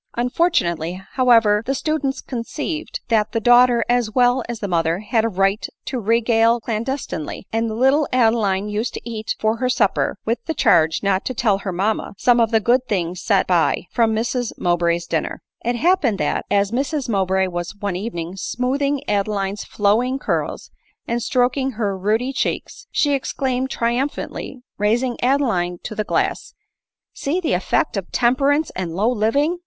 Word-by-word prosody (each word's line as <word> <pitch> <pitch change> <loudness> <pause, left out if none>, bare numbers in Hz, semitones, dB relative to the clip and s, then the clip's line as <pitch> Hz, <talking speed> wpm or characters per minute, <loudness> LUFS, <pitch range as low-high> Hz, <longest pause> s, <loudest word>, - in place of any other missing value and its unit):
Unfortunately, 190 - 0
however, 230 -5 +4
the 270 - 0
servants 295 -2 -1
conceived 295 +6 -5
that 215 -2 +1
the 225 - +1
daughter 240 0 +5
as 245 -2 +1
well 245 +2 +3
as 235 -2 -4
the 205 - -3
mother 165 -2 +1
had 220 +1 +1
a 230 - +1
right 195 +1 0 0.2
to 260 - -3
regale 230 +1 +3
clandestinely; 230 - -4
and 225 0 0
the 215 - -4
little 270 +5 +3
Adeline 220 -5 +2
used 210 +3 -2
to - - -5
eat 220 -2 -3
for 220 +1 +1
her 255 +1 0
supper, 255 - +1
with 230 +1 0
a 320 - 0
charge 160 - +3
not 195 -1 +1
to 255 - -3
tell 210 -4 +2
her 195 -1 -4
mamma, 200 +4 -1
some 245 +2 +3
of 230 -2 +3
the 225 -1 +3
good 250 +3 +2
things 180 -3 -2
set 200 -3 +2
by 175 -1 +1
from 230 -2 +2
Mrs 240 +1 -1
Mowbray's 175 -1 +1
dinner. - - -2 0.2
It 240 +1 0
happened 285 - +2
that, - - -1
as 200 0 +2
Mrs 275 +3 -1
Mowbray 190 -3 +1
was 175 +1 -4
one 200 -2 -3
evening 180 -3 -5
smoothing 275 +6 -1
Adeline's 200 -1 -1
flowing 225 +6 +1
curls, - - -3 0.4
and 235 +1 -1
stroking 255 +3 +1
her 210 -3 -1
ruddy 220 +7 0
cheek, - - -1 0.3
she 290 -2 +1
exclaimed 265 -1 -1
triumphantly, 250 +1 -3 0.2
raising 235 +4 0
Adeline 235 -10 +1
to - - -5
the 215 - -2
glass, - - -2 0.3
" - - -68
See 305 +6 -2
the 335 - -1
effect 180 +1 0
of 190 -2 -5
temperance 275 +5 +2
and 175 -3 -4
low 215 +6 +2
living 280 +10 +1
230 Hz, 170 wpm, -21 LUFS, 200-255 Hz, 0.4 s, daughter